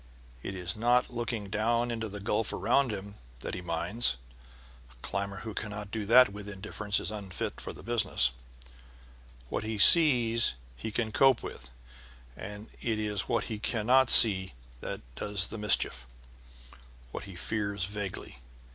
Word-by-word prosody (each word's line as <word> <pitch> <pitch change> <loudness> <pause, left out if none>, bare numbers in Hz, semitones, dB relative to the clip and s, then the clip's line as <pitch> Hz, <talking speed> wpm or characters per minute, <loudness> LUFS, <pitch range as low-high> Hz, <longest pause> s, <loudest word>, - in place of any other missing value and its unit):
It 95 - -6
is 90 -2 -3
not 120 +3 +2
looking 115 -4 -4
down 115 +3 0
into 115 -2 -4
the 105 +1 -7
gulf 105 +2 -1
around 140 -2 +1
him 100 0 -7 0.2
that - - -5
he 90 - -4
minds 90 - 0 0.7
(the 65 - -20
climber 100 0 -3
who 110 - -6
cannot 105 -1 -6
do 110 -3 -4
that 125 +2 +7
with 105 0 -8
indifference 105 +1 -3
is - - -4
unfit 100 -5 -5
for - - -6
the - - -13
business); 115 - +1 1.2
what - - -3
he 110 0 -3
sees 115 - +6 0.2
he - - -6
can 110 0 -2
cope 135 +1 +4
with; - - -8 0.7
it 105 +2 -8
is 105 -3 -2
what - - +1
he 110 -3 -5
cannot 125 +3 +2
see 95 - +6 0.3
that - - -6
does 100 +6 -1
the 115 - -7
mischief 65 -12 +2 1.0
what - - -6
he 95 -2 -11
fears 100 0 -2
vaguely. 100 -9 -6
105 Hz, 150 wpm, -29 LUFS, 100-115 Hz, 1.2 s, that